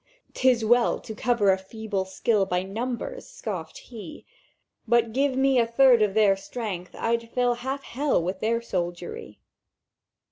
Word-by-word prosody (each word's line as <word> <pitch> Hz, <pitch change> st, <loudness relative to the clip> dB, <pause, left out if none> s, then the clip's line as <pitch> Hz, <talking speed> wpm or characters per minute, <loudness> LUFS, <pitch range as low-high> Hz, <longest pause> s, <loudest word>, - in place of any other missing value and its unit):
"''Tis 250 Hz, -3 st, +2 dB
well 240 Hz, +2 st, +3 dB
to 220 Hz, -, -8 dB
cover 215 Hz, -3 st, +2 dB
a 190 Hz, -, +1 dB
feeble 200 Hz, 0 st, -4 dB
skill 195 Hz, +1 st, +1 dB
By 180 Hz, -1 st, 0 dB
numbers!' 245 Hz, -, -5 dB
scoffèd -, -, -6 dB
He; 300 Hz, -, -10 dB, 0.6 s
'But 230 Hz, -1 st, +2 dB
give 270 Hz, +1 st, +1 dB
me 265 Hz, -1 st, +4 dB
a 230 Hz, -, +2 dB
third 245 Hz, 0 st, +5 dB
of 210 Hz, -2 st, +1 dB
their 210 Hz, -3 st, +5 dB
strength, 195 Hz, -3 st, -6 dB
I'd 230 Hz, 0 st, -1 dB
fill 245 Hz, 0 st, +1 dB
Half 270 Hz, +2 st, -3 dB
Hell 280 Hz, +3 st, 0 dB
with 185 Hz, +2 st, -3 dB
their 230 Hz, +1 st, 0 dB
soldiery! 175 Hz, -, -4 dB
230 Hz, 150 wpm, -26 LUFS, 195-250 Hz, 0.6 s, third